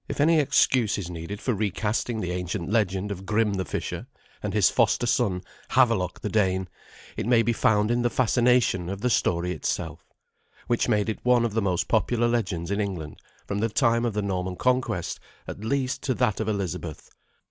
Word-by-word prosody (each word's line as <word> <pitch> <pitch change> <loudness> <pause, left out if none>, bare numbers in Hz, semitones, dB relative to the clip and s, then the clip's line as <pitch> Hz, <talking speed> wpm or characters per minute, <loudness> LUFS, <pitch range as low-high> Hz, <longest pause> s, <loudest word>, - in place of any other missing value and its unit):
If - - -5
any 160 +2 +5
excuse 130 -5 +3
is 90 -4 -5
needed 85 +4 -6
for 125 - -1
recasting 110 +2 -1
the 90 - -3
ancient 90 +1 -3
legend 100 -2 0
of 95 -1 -6
Grim 105 +1 +1
the 95 -1 -2
fisher - - -4 0.3
and 105 - -3
his 100 -2 +4
foster 115 0 +2
son 100 -7 +1 0.3
Havelok 115 -8 +2
the - - -2
Dane, 95 -3 +1 0.5
it - - -3
may 120 -2 +4
be 120 +1 +1
found 105 0 +2
in 120 0 +1
the 120 - +2
fascination 120 -7 +2
of 100 +1 -5
the 125 - +1
story 90 -3 +1
itself, - - -3 0.6
which 120 - 0
made 105 0 +2
it 110 - -2
one 125 -1 +4
of 115 - -2
the 110 - +1
most 90 -4 0
popular 120 -1 +2
legends 95 -7 -1
in 100 +1 0
England 90 -7 -5 0.3
from 100 - -3
the 115 +2 +1
time 115 0 +2
of 120 -3 0
the 105 0 -1
Norman 95 -2 -2
conquest, 125 -7 0 0.3
at 100 - -7
least, 130 +3 -1
to 130 - -1
that 120 -5 +1
of 110 -1 -1
Elizabeth. 90 -6 -4
105 Hz, 190 wpm, -26 LUFS, 95-120 Hz, 0.6 s, any